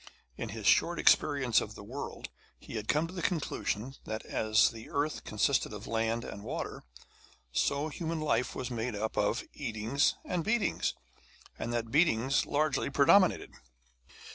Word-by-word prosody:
In -, -, -5 dB
his -, -, -7 dB
short -, -, +4 dB
experience 130 Hz, -5 st, +4 dB
of 105 Hz, 0 st, -6 dB
the -, -, -10 dB
world 130 Hz, +7 st, -6 dB, 0.3 s
he -, -, -11 dB
had 110 Hz, -1 st, -4 dB
come 150 Hz, +2 st, +2 dB
to 165 Hz, -, -9 dB
the 180 Hz, -, -4 dB
conclusion 135 Hz, -, -2 dB
that, 110 Hz, 0 st, -5 dB
as 110 Hz, 0 st, +3 dB
the 115 Hz, -1 st, -10 dB
earth 145 Hz, +2 st, -1 dB
consisted 110 Hz, +3 st, +1 dB
of 105 Hz, 0 st, -7 dB
land 115 Hz, +1 st, -1 dB
and 100 Hz, -, -8 dB
water, -, -, -4 dB, 0.7 s
so 140 Hz, -, +1 dB
human 165 Hz, +1 st, -3 dB
life 150 Hz, -5 st, 0 dB
was 125 Hz, -, -4 dB
made 120 Hz, -1 st, -2 dB
up 110 Hz, +2 st, -3 dB
of -, -, +1 dB
eatings 115 Hz, +7 st, 0 dB
and 175 Hz, -2 st, -1 dB
beatings, 220 Hz, +2 st, 0 dB, 0.6 s
and 120 Hz, -, -3 dB
that 120 Hz, -1 st, -1 dB
the 115 Hz, -, -14 dB
beatings 135 Hz, -4 st, +3 dB
largely 150 Hz, 0 st, +1 dB
predominated. 160 Hz, +8 st, +4 dB
125 Hz, 160 wpm, -31 LUFS, 110-150 Hz, 0.7 s, short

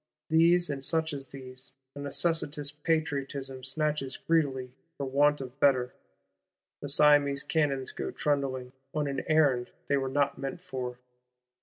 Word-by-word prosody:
These, 170 Hz, +1 st, +5 dB
and 135 Hz, -1 st, -4 dB
such 160 Hz, +1 st, +1 dB
as 135 Hz, -1 st, -5 dB
these, 130 Hz, -1 st, -8 dB, 0.2 s
a -, -, -9 dB
necessitous 145 Hz, 0 st, -1 dB
Patriotism 140 Hz, -4 st, -2 dB
snatches 140 Hz, 0 st, -1 dB
greedily, 135 Hz, -6 st, 0 dB, 0.2 s
for 140 Hz, -, -2 dB
want 145 Hz, +2 st, +3 dB
of 130 Hz, +1 st, -8 dB
better. 130 Hz, -3 st, +3 dB, 0.9 s
The 145 Hz, -, -4 dB
Siamese 145 Hz, -1 st, +5 dB
cannons 140 Hz, -5 st, 0 dB
go -, -, -4 dB
trundling, 135 Hz, -3 st, -1 dB, 0.2 s
on 150 Hz, -1 st, +1 dB
an 140 Hz, -1 st, -2 dB
errand 145 Hz, -6 st, +3 dB, 0.2 s
they 140 Hz, -, +4 dB
were 135 Hz, -1 st, -1 dB
not 140 Hz, +1 st, +1 dB
meant 135 Hz, +5 st, -4 dB
for. 130 Hz, -8 st, -5 dB
140 Hz, 140 wpm, -29 LUFS, 135-150 Hz, 0.9 s, These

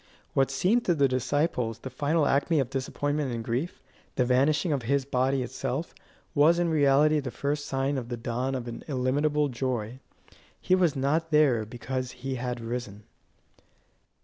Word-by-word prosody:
What 135 Hz, 0 st, +3 dB
seemed 185 Hz, -, +2 dB
to 175 Hz, -, +3 dB
the 140 Hz, -2 st, +4 dB
disciples 130 Hz, -2 st, 0 dB
the 130 Hz, +3 st, -8 dB
final 145 Hz, +4 st, +1 dB
acme 145 Hz, +3 st, +2 dB
of 130 Hz, -2 st, -1 dB
disappointment 145 Hz, +1 st, -2 dB
and 115 Hz, -1 st, -3 dB
grief, 125 Hz, +8 st, -3 dB, 0.3 s
the 125 Hz, -, +2 dB
vanishing 145 Hz, +6 st, +2 dB
of 140 Hz, -, -1 dB
his 135 Hz, +3 st, 0 dB
body 130 Hz, 0 st, +1 dB
itself, 130 Hz, +5 st, -4 dB, 0.4 s
was 155 Hz, +4 st, +5 dB
in 175 Hz, -1 st, +1 dB
reality 150 Hz, 0 st, +4 dB
the 135 Hz, -3 st, -4 dB
first 145 Hz, +3 st, -3 dB
sign 135 Hz, +1 st, 0 dB
of 120 Hz, -2 st, -8 dB
the 120 Hz, -, -3 dB
dawn 125 Hz, +3 st, -2 dB
of 125 Hz, -2 st, -4 dB
an 115 Hz, -, -7 dB
illimitable 145 Hz, +2 st, +1 dB
joy. 125 Hz, -2 st, -3 dB, 0.6 s
He -, -, 0 dB
was 180 Hz, -5 st, +3 dB
not 150 Hz, +5 st, 0 dB
there 145 Hz, -8 st, +3 dB
because 125 Hz, +2 st, -4 dB
he 130 Hz, +1 st, -5 dB
had 125 Hz, -1 st, -3 dB
risen. 115 Hz, -3 st, -5 dB
135 Hz, 165 wpm, -27 LUFS, 125-150 Hz, 0.6 s, was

